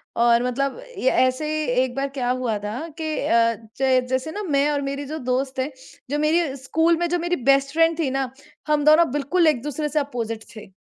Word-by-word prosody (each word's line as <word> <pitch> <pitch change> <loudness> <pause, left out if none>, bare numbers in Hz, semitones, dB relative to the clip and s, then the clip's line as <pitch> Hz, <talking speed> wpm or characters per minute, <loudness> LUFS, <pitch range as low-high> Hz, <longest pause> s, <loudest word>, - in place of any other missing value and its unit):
और 235 0 +4
मतलब 275 - -1 0.2
ये 260 - +2
ऐसे 255 +4 +2
ही 310 0 -1 0.2
एक 255 -1 -1
बार 275 0 -1
क्या 255 -3 -3
हुआ 250 -4 0
था 210 +4 -5 0.2
कि - - -3 0.2
अ, 230 0 +3 0.2
जै 260 -1 +3
जैसे 260 +4 -1
ना 415 +4 -5
मैं 290 -4 +1
और 285 -1 -1
मेरी 280 +1 -4
जो 310 +3 -5
दोस्त 260 +1 -2
है, 270 +3 -1 0.4
जो 295 - -1
मेरी 305 -2 +1
स्कूल 325 +4 +2
में 345 +1 0
जो 355 - 0
मेरी 345 +1 0 0.2
बेस्ट 275 +1 +1
फ्रेंड 330 0 +3
थी 290 -5 +1
ना, 270 -1 -1 0.4
हम 300 -1 +2
दोनों 310 -1 +6
बिल्कुल 295 +5 +1
एक 285 -7 +2
दूसरे 295 +1 -3
से 300 - +1
अपोज़िट 230 -5 -4
थे। 205 -3 -12
275 Hz, 215 wpm, -23 LUFS, 255-310 Hz, 0.4 s, दोनों